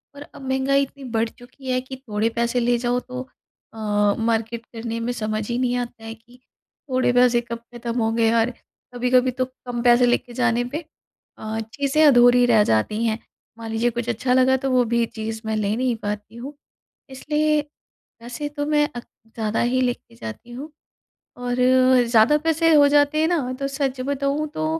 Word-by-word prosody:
और 285 - -11
अब 290 - -12
महँगाई 270 +1 +2
इतनी 275 0 -10
बढ़ 225 0 0
चुकी 255 +2 -9
है 255 - +1
कि 260 +1 -9
थोड़े 225 -4 -2
पैसे 235 +1 0
ले 240 0 +2
जाओ 245 +1 0
तो 255 0 -7 0.5
अ, 225 - -13 0.4
मार्केट 225 0 -1
करने 230 0 -6
में 235 +2 -2
समझ 215 -2 -3
ही 235 - -1
नहीं 250 -1 0
आता 240 -2 -6
है 225 - -6
कि 240 +3 -22 0.5
थोड़े 255 -1 +2
पैसे 245 -1 +4
कब 235 0 -6 0.2
ख़त्म 235 0 -4
होंगे? 225 0 +2
और 230 +1 +2 0.4
कभी-कभी 250 +1 +2
तो 255 +1 -1
कम 245 -2 -7
पैसे 245 0 +5
लेके 245 0 0
जाने 245 -1 +1
पे 310 +2 -4 0.5
अ, 220 +1 -4
चीज़ें 280 +3 +1
अधूरी 245 -2 +6
रह 225 -3 +5
जाती 205 - 0
हैं। 220 0 0 0.4
मान 225 -1 -7
लीजिए 230 +2 +1
कुछ 240 0 -4
अच्छा 250 +2 0
लगा 260 +1 +4
तो 270 +1 -3
वो 250 -1 +4
भी 235 0 +3
चीज़ 220 -1 -6
मैं 220 0 -1
ले 210 0 0
नहीं 250 0 0
पाती 210 +1 -5
हूँ। 260 +5 -8 0.6
इसलिए 300 +3 0 0.6
वैसे 245 +5 -5
तो 290 0 -4
मैं 295 -1 +2
अक 240 - -6 0.3
ज़्यादा 220 -1 -1
ही 245 +2 +1
लेके 245 - -3
जाती 115 - -9
हूँ 270 +6 -7 0.7
और 245 0 -2 0.5
ज़्यादा 235 +6 +5
पैसे 325 +1 +2
हो 285 -1 +7
जाते 290 +1 +3
हैं 320 - +3
ना 290 -8 -1
तो 275 - -1
सच 275 -2 -2
बताऊँ 280 +2 -1
तो 155 - -2
245 Hz, 185 wpm, -22 LUFS, 230-265 Hz, 0.7 s, हो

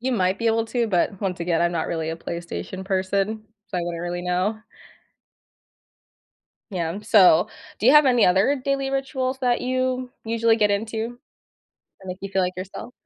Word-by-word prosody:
you 255 +1 -1
might 190 -3 +1
be 230 - -1
able 225 0 +2
to, 235 0 0
but 190 0 0
once 185 -3 -2
again, 170 -1 0
I'm 175 0 +1
not 165 - -1
really 160 -1 -2
a 165 - -4
PlayStation 170 +3 -6
person, 195 +3 -1 0.3
so 185 - -3
I - - 0
wouldn't 170 -1 -4
really 175 0 -3
know. 180 +4 0 2.2
Yeah, 170 0 -2
so, 195 -6 +5 0.3
do 220 - 0
you 260 - +8
have 300 -1 +7
any 245 -4 +5
other 195 +10 +3
daily 275 -1 0
rituals 265 -1 -2
that 250 -2 +1
you 255 0 -1
usually 230 0 +2
get 210 -2 +3
into 225 +3 -3 0.8
that 190 - -13
make 185 - -5
you 195 - -5
feel 190 0 +1
like 180 0 -2
yourself? 190 +6 -7
200 Hz, 180 wpm, -23 LUFS, 180-245 Hz, 2.2 s, you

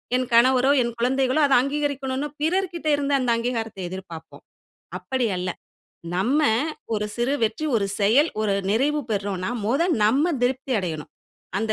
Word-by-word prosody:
என் 255 0 0
கணவரோ! 255 +2 +5
என் 235 0 -3
குழந்தைகளோ! 260 +4 +1
அத 275 - +2
அங்கீகரிக்கணுனு 280 -1 -2
பிறர்க்கிட்ட 345 0 -1
இருந்து 285 0 -1
அந்த 250 -2 -1
அங்கீகாரத்த 230 -4 -3
எதிர்பாப்போம். 180 -3 -10 0.5
அப்பிடி 260 -3 -1
அல்ல, 180 0 -2 0.7
நம்ம 245 +11 +2 0.5
ஒரு 210 0 -1
சிறு 240 +4 0
வெற்றி, 225 +8 -2
ஒரு 200 -3 0
செயல், 245 +11 +4
ஒரு 205 -2 +1 0.2
நிறைவு 285 +8 +1
பெறுறோன்னா 200 -2 -2 0.2
முத 270 +9 +2 0.2
நம்ம 260 +8 +3 0.2
திருப்தி 260 +1 0
அடையணும். 160 -6 -4 0.5
அந்த 220 +1 0
250 Hz, 140 wpm, -23 LUFS, 210-275 Hz, 0.7 s, கணவரோ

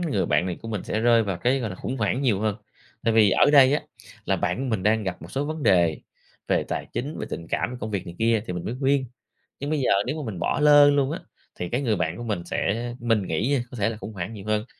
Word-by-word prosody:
người 140 - 0
bạn 90 - +2
này 90 - -4
của 115 - -7
mình 105 -4 -4
sẽ 110 - -2
rơi 115 0 +4
vào 100 -4 -2
cái, 130 +7 +1
gọi 115 -4 -3
là, 95 - -7
khủng 130 +7 -4
hoảng 115 +4 0
nhiều 110 -7 +2
hơn. 110 -1 0 0.5
Tại 115 - +2
vì 105 -3 +6
ở 145 - +4
đây 140 -2 +7
á, - - -1 0.4
là - - +1
bạn 90 +6 -1
của 135 - -2
mình 110 -5 -1
đang 110 +2 +2
gặp 95 -2 -5
một - - -10
số 140 +2 -1
vấn 155 0 -4
đề 85 - +3 0.5
về - - +2
tài - - -3
chính, 145 +5 -4
về - - -4
tình 85 - -5
cảm, 125 0 -2
công 110 - -4
việc 95 -3 -3
này 85 - -8
kia 115 -1 +2
thì 90 - -3
mình 90 - -5
mới 120 - -3
khuyên. 135 0 +2 0.6
Nhưng 140 - -4
bây 155 -1 0
giờ 130 - +1
nếu 150 - -2
mà 110 - -4
mình 90 - -7
bỏ - - 0
lơ 145 -1 +7
luôn 140 0 +2
á, - - -3 0.4
thì 90 - -3
cái 125 +4 -1
người 115 -5 +1
bạn 80 -2 -2
của - - -6
mình 105 -7 -2
sẽ 115 +7 -2
mình 115 -4 +1
nghĩ 110 - 0
nha 140 -4 +1
có 125 - -8
thể 105 +2 +1
là 115 - -5
khủng 110 - -8
hoảng 95 +3 -5
nhiều 100 -2 -9
hơn. 110 +1 0
115 Hz, 290 wpm, -25 LUFS, 100-135 Hz, 0.6 s, đây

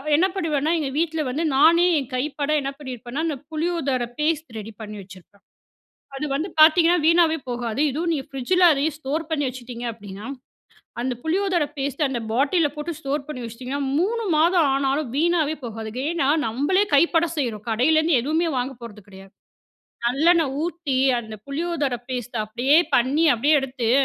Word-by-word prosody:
என்ன 335 +5 +4
பண்ணுவேன்னா, 315 -4 0
எங்க 290 -3 -2
வீட்ல 320 -1 0
வந்து 295 +6 -2
நானே 330 +5 +5
என் 270 - -7
கைப்பட 285 +2 -2
என்ன 275 - -3
பண்ணிருப்பேன்னா, 260 +1 -5
அந்த 310 - -1 0.2
புளியோதரை 310 -6 -1
பேஸ்ட் 315 +1 0
ரெடி 215 +1 -8
பண்ணி 210 0 -7
வச்சிருப்பேன். 190 +1 -16 0.7
அது 285 +3 -3
வந்து 310 +7 -2
பார்த்தீங்கன்னா, 335 +2 +6
வீணாவே 330 -1 +4
போகாது. 240 0 -3
இதுவும் 325 +5 -2
நீங்க 275 -4 -2
ஃப்ரிட்ஜில 355 +8 +2
அதையும் 295 +1 -1
ஸ்டோர் 310 +2 -3
பண்ணி 300 -2 0
வச்சுட்டீங்க 245 -1 -8
அப்படீன்னா, 205 -1 -10 0.8
அந்த 255 +1 -1
புளியோதரை 350 -1 +1
பேஸ்ட்டு 280 +2 -1
அந்த 265 -3 -3
பாட்டில்ல 290 +6 +2
போட்டு 300 +3 -4
ஸ்டோர் 280 -1 -3
பண்ணி 300 -5 -6
வச்சுட்டீங்கன்னா, 250 +5 -5 0.2
3 455 +6 0
மாதம் 330 0 +4
ஆனாலும் 275 0 0
வீணாவே 320 -1 +1
போகாதுங்க. 225 +1 -5
ஏன்னா, 335 -6 0 0.2
நம்பளே 290 - +1
கைப்பட 335 +3 +3
செய்றோம். 230 -7 -2
கடையிலேருந்து 310 +5 +3
எதுவுமே 320 +6 0
வாங்க 255 +2 -2
போறது 215 -3 -10
கிடையாது. 195 -1 -14 0.7
நல்லெண்ணெய் 310 +2 +3
ஊத்தி 335 -6 -2 0.2
அந்த 220 -2 -9
புளியோதரை 290 -3 -2
பேஸ்ட்ட 245 -2 -4
அப்படியே 245 +7 +2 0.2
பண்ணி, 270 +7 +2
அப்படியே 285 +7 +2
எடுத்து 255 -4 -2
285 Hz, 150 wpm, -23 LUFS, 245-325 Hz, 0.8 s, பார்த்தீங்கன்னா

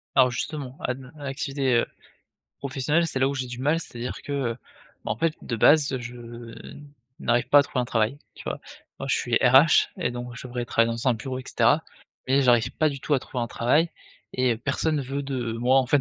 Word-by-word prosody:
Alors 130 -2 +5
justement, 135 +1 -4
à - - 0
à 135 +3 -9
l'activité, 135 -1 -1
heu, 115 - +2 0.7
professionnelle, 140 +5 0
c'est 135 - -2
là 130 - +4
où - - -2
j'ai 130 -2 -3
du 125 0 -7
mal, 150 +5 +2
c'est-à-dire 125 -6 -6
que, 145 - -7 0.2
heu, 115 - -7 0.5
bah - - -1
en 105 - -3
fait 160 +3 +1
de 120 - -3
base, 140 +3 +5
je 120 -1 -9 0.7
n'arrive 120 0 +1
pas 145 +2 +7
à - - +5
trouver 130 -2 -2
un - - -2
travail, 115 +2 0 0.2
tu - - -11
vois? - - -4 0.4
Moi, 135 - -4
je - - +3
suis 120 -1 0
RH 130 +6 +6
et 120 - -1
donc 120 0 -6
je 125 - -8
devrais 120 -1 -4
travailler 115 0 +2
dans 115 +3 -2
un 125 - +5
bureau, 130 +3 -5
et 130 - -8
cetera, 140 +7 +3 0.5
mais 135 +2 +4
j'arrive 120 -3 +4
pas 155 -1 +3
du 140 -2 -6
tout 150 - -1
à 140 - +3
trouver 125 -1 -5
un 115 - -1
travail 145 +10 +2 0.4
et 130 -1 +2
heu, - - -6
personne 140 +5 0
ne - - -1
veut 135 +2 -4
de 125 -4 -3
moi 125 +3 +3
en 130 - +1
fait 140 +3 +3
130 Hz, 230 wpm, -25 LUFS, 120-140 Hz, 0.7 s, pas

